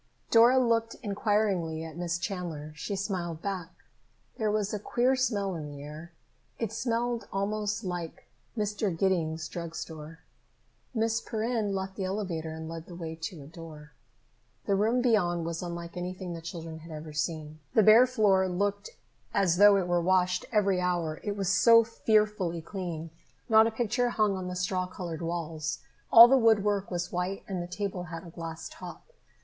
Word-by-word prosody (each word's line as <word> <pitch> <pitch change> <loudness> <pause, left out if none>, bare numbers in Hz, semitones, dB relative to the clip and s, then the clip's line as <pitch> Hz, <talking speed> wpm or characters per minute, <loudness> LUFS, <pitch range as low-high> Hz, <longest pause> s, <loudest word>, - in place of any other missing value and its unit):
Dora 235 +3 +7
looked 230 -2 +2
inquiringly 200 -6 0
at 160 -2 -8
Miss 170 0 -2
Chandler. 170 -5 -5
She 200 +7 -4
smiled 180 -5 -3
back. 185 -4 -3 0.7
There 215 -1 +1
was 210 -1 0
a 210 - -2
queer 245 +5 +1
smell 205 -7 0
in 155 -3 -5
the 145 -1 -9
air. 155 +4 -9 0.5
It 225 -3 -2
smelled 235 0 -1
almost 210 +2 -1
like 175 -3 -5 0.3
Mr. 210 -4 -1
Giddings' 165 -4 0
drug 170 0 -6
store. 160 0 -7 0.8
Miss 225 0 +1
Perrin 220 -3 -1
left 190 0 -4
the 195 - -2
elevator 185 -5 -3
and 160 0 -7
led 165 0 -7
the 175 - -9
way 165 -2 -5
to 160 -1 -7
a - - -12
door. 155 -1 -11 0.7
The 200 - +1
room 225 +5 +2
beyond 175 -8 +2
was 165 0 -3
unlike 170 -1 -6
anything 180 0 -5
the 165 - -7
children 165 -1 -7
had 165 +1 -12
ever 155 0 -7
seen. 155 0 -3 0.2
The 220 - +6
bare 225 +5 +8
floor 205 -6 +3
looked 200 +3 -1 0.5
as 175 -3 +3
though 205 0 +7
it 185 -2 0
were 175 0 +2
washed 180 0 +2
every 200 -4 +2
hour, 175 -3 -1
it 205 -1 -3
was 195 -2 -1
so 230 +3 +6
fearfully 210 -6 +1
clean! 165 -3 -5 0.4
Not 220 -1 +6
a - - -1
picture 240 +2 0
hung 215 -4 +1
on 185 -1 -4
the 180 - -4
straw 185 0 -1
colored 175 -3 -6
walls. 165 -2 -3 0.3
All 230 +1 +12
the 265 +2 +5
woodwork 205 -3 +3
was 175 -1 -3
white 180 +2 -2
and 185 -3 -3
the 175 - -5
table 185 -1 -4
had 165 -1 -7
a 170 - -10
glass 165 -1 -6
top. - - -10
185 Hz, 175 wpm, -29 LUFS, 165-210 Hz, 0.8 s, All